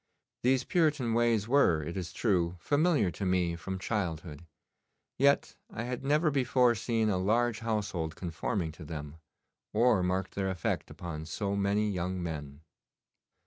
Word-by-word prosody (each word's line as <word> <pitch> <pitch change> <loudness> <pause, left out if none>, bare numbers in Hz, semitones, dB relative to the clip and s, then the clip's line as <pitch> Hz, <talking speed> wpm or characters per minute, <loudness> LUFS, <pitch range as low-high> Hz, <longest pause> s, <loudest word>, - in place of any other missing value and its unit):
These 130 +1 +3
Puritan 150 -9 +1
ways 115 -3 +2
were, 115 - +4
it 85 +3 -5
is 90 -3 -4
true, 90 -6 +1
familiar 145 - +2
to 100 - -6
me 90 -2 +1
from 95 +3 -5
childhood, 85 -5 -3 0.7
yet 140 +1 +3
I 115 - -5
had 125 +1 -4
never 150 +3 +3
before 125 -2 +3
seen 115 0 0
a 95 -3 +1
large 115 +4 +1
household 100 -8 -2
conforming 85 0 -2
to 80 +2 -11
them, 75 0 -7 0.6
or 110 -2 +4
marked 90 +1 -1
their 95 -1 -1
effect 95 -2 -2
upon 80 -3 -6
so 100 +4 -2
many 100 +1 +1
young 90 -2 -2
men. 75 -3 -6
100 Hz, 145 wpm, -30 LUFS, 85-120 Hz, 0.7 s, were